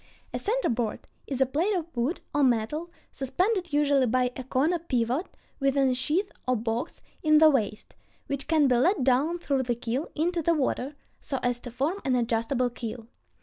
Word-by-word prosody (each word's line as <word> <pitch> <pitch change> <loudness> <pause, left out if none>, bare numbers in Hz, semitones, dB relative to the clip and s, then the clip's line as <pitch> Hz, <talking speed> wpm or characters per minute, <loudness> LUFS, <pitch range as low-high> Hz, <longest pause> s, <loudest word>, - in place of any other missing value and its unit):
A - - -2
center 475 +4 0
board 230 -2 -1 0.3
is 270 -2 -3
a - - +6
plate 330 +11 0
of 335 -3 -4
wood 245 +9 -1
or 290 - +2
metal, 260 +7 +1 0.2
suspended, 360 - 0
usually 285 -3 +3
by 250 +1 +1
a 260 - -5
corner 290 +7 +1
pivot, 255 0 -1 0.3
within 275 -1 +3
a - - +2
sheath 305 +10 0 0.2
or 255 - +3
box 230 +5 -3 0.2
in 310 -1 +5
the 310 0 +7
waist, 215 -6 -2 0.3
which 280 -1 -4
can 310 -3 +4
be 250 -2 +3
let 330 - +3
down 270 +7 +2
through 280 -6 0
the 245 -2 -1
keel 245 +5 -3
into 340 +2 0
the 335 +2 +2
water, 275 -1 -1 0.2
so 270 - -3
as 245 -1 +1
to 245 - -8
form 285 - -2
an 260 -2 +1
adjustable 240 +1 0
keel. 230 -1 -6
270 Hz, 190 wpm, -27 LUFS, 245-315 Hz, 0.3 s, the